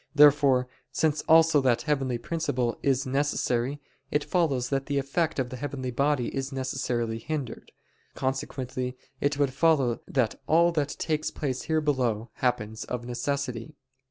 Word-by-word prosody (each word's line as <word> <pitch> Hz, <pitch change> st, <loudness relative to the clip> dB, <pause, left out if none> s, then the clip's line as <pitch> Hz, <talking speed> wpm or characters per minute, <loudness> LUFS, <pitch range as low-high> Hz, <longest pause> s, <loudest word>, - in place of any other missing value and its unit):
Therefore, 140 Hz, -3 st, +6 dB, 0.2 s
since 155 Hz, +2 st, +1 dB
also 160 Hz, -2 st, +6 dB
that 125 Hz, -3 st, +2 dB
heavenly 135 Hz, -5 st, 0 dB
principle 125 Hz, -5 st, -1 dB
is 135 Hz, -1 st, +1 dB
necessary, 135 Hz, -1 st, 0 dB, 0.3 s
it 145 Hz, 0 st, +1 dB
follows 140 Hz, -9 st, +1 dB
that 135 Hz, -1 st, -1 dB
the 145 Hz, -, 0 dB
effect 145 Hz, +4 st, 0 dB
of 125 Hz, -2 st, -1 dB
the 130 Hz, -, -5 dB
heavenly 130 Hz, -1 st, -4 dB
body 140 Hz, 0 st, 0 dB
is 135 Hz, 0 st, -2 dB
necessarily 125 Hz, -4 st, -2 dB
hindered. 145 Hz, -2 st, -5 dB, 0.4 s
Consequently 130 Hz, -1 st, -3 dB, 0.2 s
it 145 Hz, 0 st, 0 dB
would 140 Hz, -3 st, +1 dB
follow 140 Hz, -5 st, +2 dB
that 125 Hz, -5 st, 0 dB
all 170 Hz, +2 st, +5 dB
that 145 Hz, -4 st, -1 dB
takes 155 Hz, -1 st, -1 dB
place 130 Hz, -4 st, -3 dB
here 160 Hz, 0 st, +2 dB
below 125 Hz, -6 st, 0 dB
happens 110 Hz, -3 st, -1 dB
of 120 Hz, -1 st, -4 dB
necessity. 125 Hz, +1 st, -3 dB
135 Hz, 145 wpm, -27 LUFS, 125-145 Hz, 0.4 s, Therefore